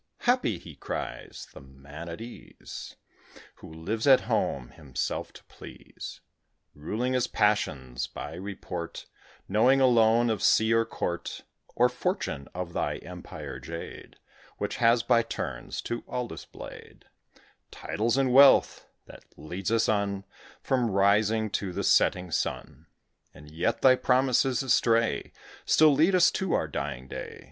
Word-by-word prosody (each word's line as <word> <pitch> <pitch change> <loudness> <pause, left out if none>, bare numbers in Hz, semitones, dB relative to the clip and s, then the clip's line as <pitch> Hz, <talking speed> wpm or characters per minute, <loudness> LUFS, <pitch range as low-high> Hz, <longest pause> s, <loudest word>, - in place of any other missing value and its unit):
"Happy," 250 0 +2
he 85 - -12
cries, - - -6
"the - - -11
man 70 +5 -11
at 85 - -7
ease, 120 +1 -10 0.6
Who - - -12
lives 100 - -3
at 135 -2 +7
home 65 -3 -1
himself 75 -6 -4
to - - -14
please; - - -11 0.5
Ruling 110 - -3
his 125 -1 +1
passions, 65 -12 0
by - - -7
report 90 -2 -6 0.4
Knowing 125 +7 +4
alone 120 -2 +4
of 110 - -2
sea 110 +1 +4
or 115 0 +3
Court, 85 -5 -4 0.3
Or 125 - +5
Fortune, 125 - -3
of 90 -1 -5
thy - - -1
empire, - - -8
Jade, 85 0 -8 0.4
Which - - -3
has 115 0 +4
by 120 -2 +4
turns 70 - -5
to 120 - -4
all 125 -1 -3
displayed - - -11 0.6
Titles 115 +4 -2
and 130 -2 +2
wealth, 135 +1 +6 0.2
that - - -14
lead 90 +7 -5
us 115 0 +2
on 100 -2 0 0.4
From 125 -3 +1
rising 105 +2 +2
to 95 -2 -2
the - - -3
setting 90 -1 +3
sun; - - -3 0.5
And 75 +2 -14
yet 90 +9 -1
thy 130 -1 +7
promises 130 0 +2
astray 115 -2 +2 0.3
Still 155 -2 +5
lead 160 +7 +3
us 175 -1 +5
to 190 -2 -2
our - - +1
dying 65 -2 -5
day. - - -7
110 Hz, 135 wpm, -27 LUFS, 85-125 Hz, 0.6 s, at